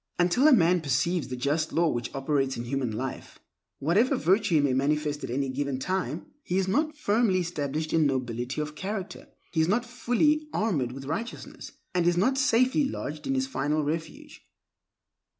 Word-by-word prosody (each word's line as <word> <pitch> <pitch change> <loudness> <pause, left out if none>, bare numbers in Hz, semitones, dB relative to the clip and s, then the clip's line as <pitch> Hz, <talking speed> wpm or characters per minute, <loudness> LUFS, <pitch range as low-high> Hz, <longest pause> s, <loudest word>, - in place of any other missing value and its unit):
Until 180 - +4
a - - +7
man 180 - +4
perceives 155 +3 0
the 130 - -4
just 145 +5 -1
law 170 0 +2
which 120 -5 -2
operates 135 -1 0
in 120 - -4
human 130 0 -2
life, 125 +4 -5 0.4
whatever 190 - +2
virtue 190 +2 +2
he - - +6
may 140 -2 +2
manifest 150 +2 0
at 130 - -4
any 135 +3 -1
given 135 0 -2
time, 185 +8 -2 0.2
he 180 -9 -2
is 190 -1 +1
not 305 +9 0
firmly 215 -6 +2
established 155 -2 -3
in 160 -2 +4
nobility 125 0 -2
of 150 0 -4
character, 190 +2 -5 0.2
he 160 - +1
is 160 - +2
not 235 +6 +1
fully 295 +5 +1
armored 155 - 0
with 135 +1 -8
righteousness, 210 - -6 0.2
and 175 -1 +2
is 175 0 +3
not 260 +9 +2
safely 260 +3 +3
lodged 150 - -5
in 270 - 0
his 265 0 +1
final 155 - -1
refuge. 160 +2 -5
160 Hz, 180 wpm, -27 LUFS, 140-210 Hz, 0.4 s, a